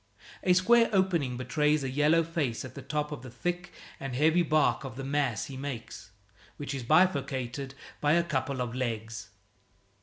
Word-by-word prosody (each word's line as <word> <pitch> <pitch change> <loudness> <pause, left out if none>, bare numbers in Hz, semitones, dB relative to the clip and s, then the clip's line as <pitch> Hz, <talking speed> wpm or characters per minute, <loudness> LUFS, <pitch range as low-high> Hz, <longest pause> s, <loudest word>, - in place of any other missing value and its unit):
A 180 - +5
square 230 +6 +5
opening 175 - +1
betrays 150 +3 +1
a 135 - -2
yellow 150 +4 +4
face 155 -9 -2
at 130 - -9
the 140 - -8
top 150 +2 -2
of 150 - -5
the 130 - -9
thick 175 +8 -3 0.3
and 135 -2 -4
heavy 160 +5 +4
bark 155 -3 +2
of 130 -3 -7
the 135 - -6
mass 135 -4 0
he 135 - -8
makes, 130 -6 -6 0.5
which 145 -1 -4
is 135 - -3
bifurcated 135 -3 +1 0.2
by 145 0 +3
a 170 +1 +4
couple 135 -4 -2
of 120 -2 -3
legs. 115 -4 -4
140 Hz, 175 wpm, -29 LUFS, 130-160 Hz, 0.5 s, A